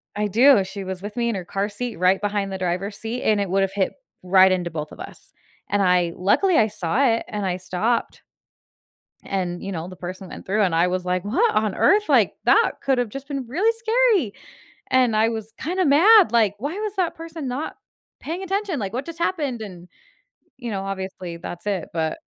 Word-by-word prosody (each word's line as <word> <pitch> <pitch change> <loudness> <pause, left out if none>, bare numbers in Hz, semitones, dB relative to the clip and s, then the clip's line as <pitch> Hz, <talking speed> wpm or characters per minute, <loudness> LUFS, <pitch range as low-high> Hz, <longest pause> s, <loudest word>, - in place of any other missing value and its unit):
I 210 0 0
do, 240 +2 +5
she 195 +1 -7
was 190 0 -6
with 205 +2 -7
me 235 0 +1
in 230 - -1
her 185 - -5
car 200 +3 -2
seat 230 +2 -5
right 185 +3 +3
behind 205 -1 -1
the 190 - -3
driver's 185 +3 -2
seat, 230 +3 -4
and 210 -2 +2
it 200 - -2
would've 195 0 +1
hit 195 -2 0 0.3
right 185 +1 +5
into 175 -2 0
both 155 -2 -5
of - - -12
us, - - -10 0.4
and 205 0 +1
I 180 -2 +2
luckily, 330 - +2
I 220 - +4
saw 205 +5 -1
it 230 -1 +1
and 205 -2 -4
I 180 -1 -1
stopped. 195 +6 -2 1.0
And, 180 -2 -3
you 195 - -4
know, 170 -2 -4
the 185 - -10
person 185 +1 -8
went - - -10
through 210 +3 +1
and 175 -4 +1
I 170 +2 +3
was 180 0 -2
like, 180 0 -1
"What 380 - +2
on 215 -2 +1
earth? 420 +1 +3
Like, - - +4
that 455 - +5
could 270 -2 +2
have 245 -3 0
just 275 +4 -8
been 275 -4 -4
really 365 - +2
scary." 445 - +2 0.6
And 250 -4 +3
I 220 +1 +4
was 225 -1 -5
kinda 365 +3 -1
mad, 360 - +6
like, 220 -4 +3
"Why 285 +9 -3
was 425 -2 -3
that 365 -3 0
person 325 -4 -7
not 260 +5 -4 0.4
paying 335 +5 -5
attention? 385 -3 -2
Like, 200 -4 -4
what 255 +5 -4
just 335 -1 -8
happened?" 300 -9 -1
And, 180 -4 -10 0.7
you 240 -3 -6
know, 195 -2 -3
obviously, 190 -3 -5
that's 175 +3 -8
it, 195 -5 -2
but 160 - -2
210 Hz, 210 wpm, -23 LUFS, 185-275 Hz, 1.0 s, mad